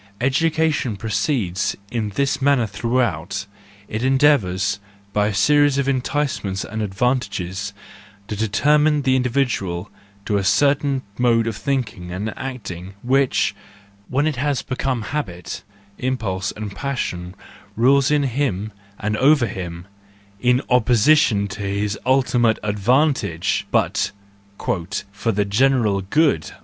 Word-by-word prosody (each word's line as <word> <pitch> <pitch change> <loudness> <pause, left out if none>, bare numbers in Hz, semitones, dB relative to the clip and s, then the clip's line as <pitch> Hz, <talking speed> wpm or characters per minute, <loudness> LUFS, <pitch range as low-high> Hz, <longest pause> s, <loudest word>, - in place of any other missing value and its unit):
Educa¬ 160 +5 +2
tion 120 -6 -2
proceeds 105 - -1 0.2
in 110 -3 -1
this 140 0 0
manner 140 -3 +3
throughout: 100 -4 -1 0.4
it 110 +2 -3
endeavours, 115 -9 +3 0.3
by 105 0 +2
a 105 - -1
series 145 +6 +4
of 140 -1 0
enticements 130 -7 -1
and 110 0 -4
advan¬ 125 +6 +1
tages, 100 -2 -5 0.6
to 105 - -4
determine 150 +8 +2
the 130 -1 +3
individual 120 -8 -1 0.3
to 105 - +1
a 100 - 0
certain 140 +6 +2 0.2
mode 115 -2 +3
of 115 -2 -2
thinking 105 -9 -3
and 105 +5 -4
acting, 100 -8 -6
which, 135 +1 +2 0.5
when 140 +3 +1
it 155 -4 -1
has 140 0 0
become 130 -2 -2
habit, 100 - -4 0.4
impulse 105 -7 -2
and 105 -2 -6
passion, 95 -9 -3 0.4
rules 135 +4 +4
in 150 -1 +3
him 115 -6 -1 0.3
and 105 +1 -1
over 140 -1 +5
him, 90 -4 -6 0.5
in 125 +2 +2
opposition 120 -2 +4
to 100 +1 -7
his 100 +1 -1
ultimate 125 -3 +3
advantage, 105 - +1
but - - +1 0.3
" 100 0 -32 0.5
for 100 +3 -1
the 105 0 0
general 110 -2 +2
good." 100 - +1
115 Hz, 125 wpm, -21 LUFS, 100-135 Hz, 0.6 s, over